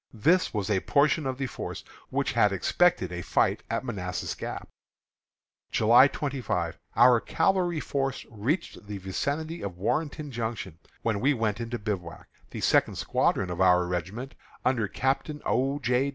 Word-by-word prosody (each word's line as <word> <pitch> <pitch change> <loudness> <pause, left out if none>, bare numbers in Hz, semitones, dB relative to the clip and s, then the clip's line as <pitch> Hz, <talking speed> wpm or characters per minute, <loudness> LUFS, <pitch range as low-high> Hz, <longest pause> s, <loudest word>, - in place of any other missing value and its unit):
This 170 - +3
was 105 -1 -2
a 95 - +3
portion 145 - +2
of 130 -1 -2
the 135 - -2
force 125 - -6 0.3
which - - 0
had 105 - +3
expected 100 - +2
a 90 0 -4
fight - - +1
at - - -2
Manassas 90 -7 -3
Gap. - - -6 1.0
July 120 +5 +6
25. 125 - -3 0.2
Our 120 0 +7
cavalry 180 -4 +1
force 135 -2 -2
reached 115 - -2
the 105 -1 -5
vicinity 145 - -3
of 95 -3 -5
Warrenton 150 - -2
Junction, 110 -8 -4 0.2
when 110 -3 0
we 140 +5 +3
went 110 -1 -1
into 115 +1 -3
bivouac. 100 -6 -5 0.2
The - - -6
second - - +3
squadron 95 -3 0
of 90 - -3
our 90 -1 +5
regiment, 95 +9 -4 0.3
under 120 -5 +2
Captain 135 +6 -1
O. 135 +3 +1
J. 125 +1 +1
120 Hz, 150 wpm, -27 LUFS, 100-140 Hz, 1.0 s, Our